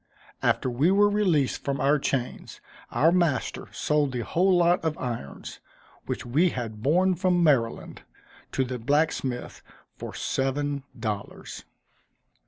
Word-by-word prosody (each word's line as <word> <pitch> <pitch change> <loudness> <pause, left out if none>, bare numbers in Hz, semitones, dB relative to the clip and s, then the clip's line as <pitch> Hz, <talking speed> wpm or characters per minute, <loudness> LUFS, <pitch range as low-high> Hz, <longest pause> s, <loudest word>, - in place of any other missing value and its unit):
After - - +1
we 130 +7 +2
were 205 +2 +4
released 180 -10 +1
from 140 -1 -2
our 145 +2 +3
chains, 130 -2 -3 0.3
our 160 +3 +3
master 170 -9 0
sold 150 -3 0
the 125 - -2
whole 180 - +2
lot 175 0 +3
of 160 -2 -1
irons, 115 - -6 0.5
which - - -4
we 150 +10 +3
had 115 -7 -5
borne 180 +9 +3
from 180 0 +2
Maryland, 130 -8 +1 0.5
to 135 - +1
the 125 -1 -4
blacksmith, 140 -1 -1 0.4
for - - -7
seven 140 +1 -1 0.2
dollars. 105 -3 -5
145 Hz, 130 wpm, -26 LUFS, 125-170 Hz, 0.5 s, were